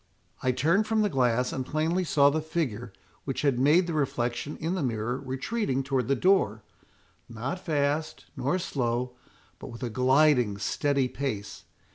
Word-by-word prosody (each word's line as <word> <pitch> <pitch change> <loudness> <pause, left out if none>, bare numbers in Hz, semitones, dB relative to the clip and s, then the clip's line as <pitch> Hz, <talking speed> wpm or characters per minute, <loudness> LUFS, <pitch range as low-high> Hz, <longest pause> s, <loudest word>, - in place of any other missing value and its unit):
"I 130 - +2
turned 165 - +2
from 220 -1 +2
the 205 - 0
glass, 125 -1 +1
and 130 - -2
plainly 160 +7 0
saw 145 -4 +4
the 155 +2 -1
figure 130 -9 -3 0.3
which 135 0 -3
had 135 -4 +2
made 155 +7 +4
the 170 - -3
reflection 135 -1 -2
in 165 +3 -2
the 185 - -2
mirror 120 -1 -2
retreating 135 - -2
towards 130 -3 -1
the 140 - +2
door, 110 - +2 0.7
not 120 +9 -4
fast, 150 -1 -1
nor 185 - 0
slow, 125 -7 -2 0.4
but - - -8
with 120 -1 -9
a 120 - -3
gliding 130 -3 +3
steady 140 +5 0
pace. 105 -9 -5
135 Hz, 160 wpm, -27 LUFS, 125-155 Hz, 0.7 s, saw